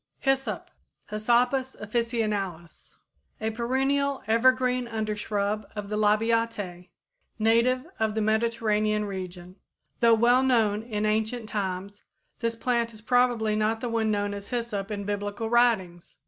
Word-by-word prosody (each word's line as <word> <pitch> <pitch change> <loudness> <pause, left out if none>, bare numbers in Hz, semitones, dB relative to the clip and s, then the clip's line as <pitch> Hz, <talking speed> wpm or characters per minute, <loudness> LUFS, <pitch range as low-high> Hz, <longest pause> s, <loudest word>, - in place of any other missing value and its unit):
=Hyssop= 270 0 -1 0.4
(Hyssopus 245 +5 +1
officinalis, 210 -6 -3 0.4
Linn.), 220 0 -2
a - - -13
perennial 270 +3 0
evergreen 250 +2 +3
undershrub 215 -2 -2
of 205 -1 -5
the 210 - -2
Labiatæ, 215 -4 0 0.5
native 235 +4 +3
of 220 -1 0
the 220 - 0
Mediterranean 215 -1 +1
region. 185 -2 -7 0.4
Though 230 -1 +6
well 240 +3 +4
known 225 -5 +2
in 215 -2 -3
ancient 220 +2 -1
times, 200 -1 -4 0.4
this 230 -1 -1
plant 235 0 0
is 215 - -12
probably 245 -3 +2
not 215 +1 +1
the 245 - -3
one 225 -1 0
known 205 -1 0
as 200 0 -7
hyssop 230 -5 -3
in 205 -1 -4
Biblical 205 +2 -3
writings. 210 -8 +1
220 Hz, 130 wpm, -27 LUFS, 205-235 Hz, 0.5 s, Though